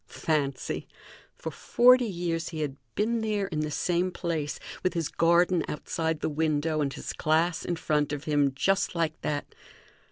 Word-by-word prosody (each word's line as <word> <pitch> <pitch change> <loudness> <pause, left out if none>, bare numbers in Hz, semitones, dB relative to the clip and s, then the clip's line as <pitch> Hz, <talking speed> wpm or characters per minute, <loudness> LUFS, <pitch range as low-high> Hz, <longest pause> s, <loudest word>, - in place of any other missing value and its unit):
Fancy! 140 -5 -2 0.5
For - - -5
forty 250 0 +5
years 170 -4 -2
he 160 -2 -4
had 145 -3 -2 0.2
been 225 +2 +1
there 210 -2 0
in 165 -5 -3
the 155 0 -1
same 175 +4 0
place, 165 -5 -3 0.2
with 185 - 0
his 165 -3 -1
garden 170 +1 +3
outside 160 +1 -2
the - - 0
window 155 0 0
and 140 -2 0
his - - -5
class 160 +2 +1
in 175 - -1
front 150 -3 0
of 145 -1 -3
him, 145 -2 +2
just 195 +6 +1
like 165 -2 -1
that. 145 -1 -3
160 Hz, 165 wpm, -28 LUFS, 150-180 Hz, 0.5 s, forty